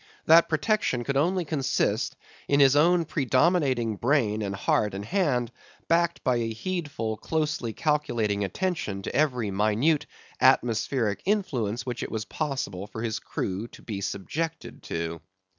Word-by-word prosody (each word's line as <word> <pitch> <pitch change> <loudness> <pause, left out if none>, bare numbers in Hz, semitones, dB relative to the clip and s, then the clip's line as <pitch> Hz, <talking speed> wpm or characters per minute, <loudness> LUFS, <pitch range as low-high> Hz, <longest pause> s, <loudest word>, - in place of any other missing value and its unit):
That 165 +1 +6
protection 160 - +1
could 140 +3 -2
only 175 +5 +1
consist 145 -3 0 0.3
in 140 - +3
his 140 -1 +6
own 170 +3 +4
predominating 130 - +1
brain 115 -5 +1
and 100 -1 -2
heart 100 +1 +1
and 100 +1 -5
hand, 135 - 0 0.4
backed 170 0 +1
by 125 -1 +2
a 115 -1 -1
heedful, 140 -6 -3
closely 150 -4 -1
calculating 115 -8 0
attention 100 - -2
to - - -5
every 125 -8 +1
minute 110 +10 +2 0.3
atmospheric 120 -3 +2
influence 125 - -1
which 125 -2 -4
it - - -4
was 110 -1 -3
possible 130 - -3
for 110 +2 -6
his 110 -2 -2
crew 100 +4 -4
to - - -15
be 100 -4 -5
subjected 155 - -4
to. 85 0 -4
125 Hz, 140 wpm, -27 LUFS, 110-155 Hz, 0.4 s, That